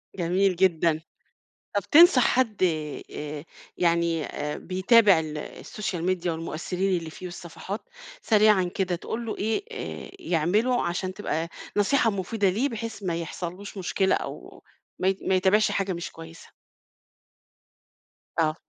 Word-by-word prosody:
جميل 185 +1 +2
جدًا، 170 -3 +2 0.7
طب 205 - +3
تنصح 315 -6 +8
حد 230 -6 +1 0.5
آآ، 150 0 -5 0.3
يعني 170 -2 +2
آآ، 150 0 -4
بيتابع 195 0 +4
ال 155 -1 -5 0.3
الSocial 200 -6 -4
Media 180 -1 -1
والمؤثرين 175 +3 -1
اللي 165 -1 -6
فيه 185 - -10
والصفحات، 180 - -7 0.3
سريعًا 210 -3 +4
كده 180 0 -1
تقول 230 +6 -5
له 220 - -4
إيه 220 - -1
آآ، 445 - -6
يعملُه 215 - +1
عشان 185 +2 -2
تبقى 165 -4 -3 0.3
نصيحة 225 +3 +3
مفيدة 200 0 0
ليه 240 +10 0
بحيث 225 -2 -6
ما 175 -3 -1
يحصلش 175 +4 -6
له 195 - -6
مشكلة 190 +1 +1
أو - - -7 0.4
ما 185 - +1
ي 195 0 +2
ما 190 - +1
يتابعش 195 +3 +3
حاجة 195 -1 -1
مش 170 - -5
كويسة؟ 165 0 -12 1.9
آه. 155 -1 +2
185 Hz, 135 wpm, -26 LUFS, 170-210 Hz, 1.9 s, تنصح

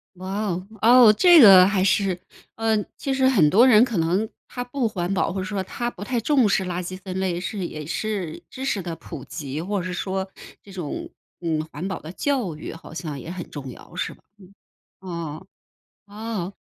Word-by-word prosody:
哇 190 +3 -4
哦。 180 +1 -3 0.2
哦， 235 -1 +8
这 345 - +7
个 190 -5 +10
还 195 -1 +1
是 195 -2 +2 0.4
嗯， 220 -2 +1
其 275 - -2
实 265 0 +3
很 190 - +5
多 225 +11 +6
人 235 -2 +7
可 235 -7 -2
能 180 +7 +1 0.2
他 245 - -5
不 245 -1 -1
环 180 -3 -3
保， 185 - 0
或 190 - -3
者 - - -3
说 195 0 -2
他 240 +5 -4
不 195 - -12
太 245 +3 -1
重 260 -2 +3
视 195 -1 +1
垃 180 0 -3
圾 185 +1 -6
分 185 0 -5
类 180 -2 -1
是 195 0 -4
也 155 -3 -7
是 195 -2 -3
知 260 - -7
识 210 -8 -1
的 170 -1 -4
普 150 -6 -9
及， 145 0 -5
或 200 +2 -2
者 175 - -5
是 185 - -3
说， 190 +1 -3 0.3
这 200 - -14
种 175 -6 -5 0.3
嗯， 160 -2 -1
环 160 +6 -5
保 190 -3 -4
的 155 - -9
教 240 - -1
育 - - -7
好 165 - -12
像 155 -3 -5
也 150 - -8
很 175 -1 -6
重 135 -3 -7
要 - - -14
是 - - -3
吧？ - - -26 0.8
嗯， 185 -1 -9 0.3
哦， 185 - -14 0.6
哦。 205 -3 -5
190 Hz, 225 characters per minute, -23 LUFS, 175-220 Hz, 0.8 s, 个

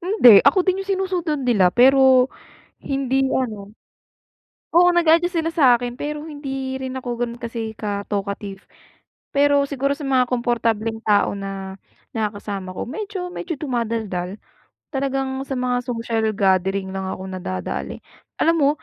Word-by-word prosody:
Hindi. 340 - +7
Ako 360 +6 +4
din 375 0 +1
yung 390 - -15
sinusunod 360 -6 -1
nila 200 -8 +4
pero 260 0 +6 0.5
hindi 270 -1 0
ano 215 -6 -2 1.0
Oo, 355 +1 +6
nag-a-adjust 340 +1 +3
sila 330 0 0
sa'kin. 245 -5 +3
Pero 300 0 -4
hindi 270 -3 -5
rin 260 0 -5
ako 245 -2 -4
gano'n 240 0 -3
kasi 225 -1 -4
ka-talkative. 200 -1 -4 0.7
Pero 285 0 +4
siguro 275 0 -1
sa 300 - -9
mga 260 -2 +4
komportableng 230 -2 0
tao 205 -1 +3
na 195 -1 -6 0.4
nakakasama 205 -3 -3
ko, - - -3
medyo 375 - -5
medyo 345 -2 -4
dumadaldal. 220 - -3 0.5
Talagang 270 -1 -2
sa 270 - -3
mga 250 0 0
social 230 -2 -1
gathering 190 0 +1
lang 190 0 -3
akong 190 0 -6
nadadali. 95 - -5 0.4
Alam 330 +1 +4
mo, 280 - +4
250 Hz, 135 wpm, -21 LUFS, 210-285 Hz, 1.0 s, Hindi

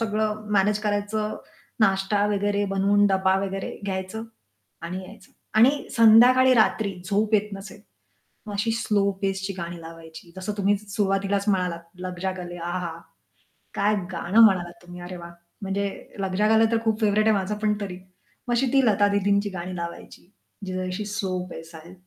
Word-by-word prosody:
सगळं 215 -1 -1
मॅनेज 205 +1 +3
करायचं, 210 +1 -1 0.4
नाश्ता 200 0 +2
वगैरे 205 0 0
बनवून 205 +1 +3
डब्बा 190 -1 +2
वगैरे 195 0 -5
घ्यायचं 190 +2 -4 0.6
आणि 180 +3 -5
यायचं. 190 - -15 0.2
आणि 265 +6 +4
संध्याकाळी, 245 +3 +7
रात्री 215 -3 +2 0.2
झोप 210 +2 +1
येत 210 0 +2
नसेल, 195 +1 -9 0.7
मग 210 - -6
अशी 205 +3 0
स्लो 205 -3 +1
पेसची 195 0 -1
गाणी 170 0 -6
लावायची, 165 +1 -12
जसं 190 +2 -4
तुम्ही 200 +1 +2
सुरुवातीलाच 200 -1 -1
म्हणालात 180 -3 0 0.2
लग 180 -1 -5
जा 190 - 0
गले 175 -1 -7
आहहा! 175 -1 -4 0.8
काय 210 +1 +2 0.2
गाणं 185 +5 +3
म्हणालात 175 -4 0
तुम्ही, 175 0 -11
अरे 180 0 -7
वाह! 170 0 -10 0.3
म्हणजे 200 0 -1 0.3
लग 190 -1 -2
जा 210 - +3
गले 225 +1 +5
तर 230 - +3
खूप 220 -1 0
फेव्हराइट 215 +1 +3
आहे 220 - +4
माझं 195 +2 -2
पण 210 0 +1
तरी. 185 -3 -5 0.5
मग 240 - 0
अशी 250 +3 +2
ती 270 -2 +4
लता 205 -2 +4
दीदींची 200 0 +1
गाणी 185 0 -6
लावायची 170 +1 -8 0.4
जी 185 - -5
जरा 185 - -2
अशी 185 +3 -4
स्लो 200 -3 -2
पेस 165 0 -10
आहे. 165 +3 -12
200 Hz, 165 wpm, -24 LUFS, 185-210 Hz, 0.8 s, संध्याकाळी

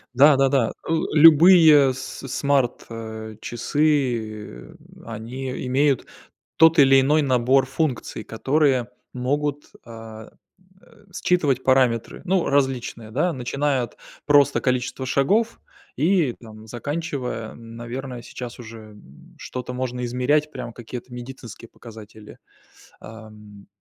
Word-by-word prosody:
Да-да-да. 135 -3 +4
Э, - - 0 0.2
любые 155 -3 +7
с 130 +1 -8
смарт, 135 -1 0
э, 110 -1 -8
часы, 120 - -2 0.3
они 125 +4 -6
имеют 135 +1 +1 0.5
тот 160 0 +6
или 135 -1 +6
иной 150 +3 +2
набор 130 0 +2
функций, 135 -6 -3
которые 130 0 0 0.2
могут, 145 +3 -2
а, 110 -1 -11 0.5
э, 210 -3 -22 0.2
считывать 145 -8 +1
параметры. 130 -3 +1
Ну, 185 -1 +1
различные, 130 -5 -1
да, 160 +9 0
начиная 135 +1 -1
от 120 - -9 0.3
просто 145 -1 +4
количества 125 +1 -2
шагов 205 - +1 0.4
и, 160 -3 +2
там, 110 -1 -13
заканчивая, 125 -2 -5
наверное, 120 +2 -8
сейчас 125 0 -9
уже, 115 -1 -10
м, 70 -10 -18
что-то 125 0 -6
можно 125 -1 -3
измерять, 145 +5 0
прям 120 -4 -7
какие-то 120 +1 -9
медицинские 120 -2 -10
показатели. 110 -2 -13 0.6
Ам, 105 -2 -13
130 Hz, 110 wpm, -22 LUFS, 115-145 Hz, 0.6 s, любые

